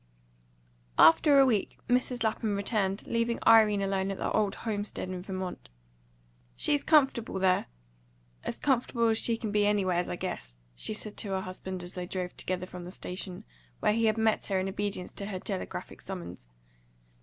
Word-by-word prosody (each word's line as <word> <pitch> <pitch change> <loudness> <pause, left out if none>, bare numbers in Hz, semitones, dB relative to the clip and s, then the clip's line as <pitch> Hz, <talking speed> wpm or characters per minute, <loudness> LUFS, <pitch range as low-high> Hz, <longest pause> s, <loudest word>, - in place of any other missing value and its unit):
XX. - - -36 0.2
AFTER 285 - +4
a 275 - +8
week 225 -6 0
Mrs. 250 -1 +1
Lapham 220 -1 0
returned, 200 -1 0
leaving 230 0 0
Irene 215 -3 +6
alone 195 0 0
at 195 - -3
the - - -2
old 210 -2 +1
homestead 210 -4 -3
in 185 -1 -4
Vermont. 185 - -6 0.9
"She's 290 - +1
comfortable 270 - +3
there 185 -1 +2 0.8
as - - -4
comfortable 240 -4 +1
as 220 0 +2
she 230 -1 +2
can 220 -2 -4
be 205 0 +3
anywheres, 185 -4 +1
I - - -2
guess," 65 - -5 0.2
she 135 - -2
said 215 -1 -6
to 205 - -3
her 190 - 0
husband 185 0 -6
as 175 - -7
they 180 -1 -5
drove 180 -1 -4
together 185 0 -3
from 180 -1 -9
the 175 - -7
station, 185 -1 -5 0.4
where - - +3
he 230 +1 +2
had 220 0 +2
met 220 -1 +1
her 195 -2 +1
in 185 - -1
obedience 195 -1 -3
to 200 - -6
her 190 -3 -4
telegraphic 90 - -5
summons. 85 -8 -7
195 Hz, 180 wpm, -29 LUFS, 180-220 Hz, 0.9 s, a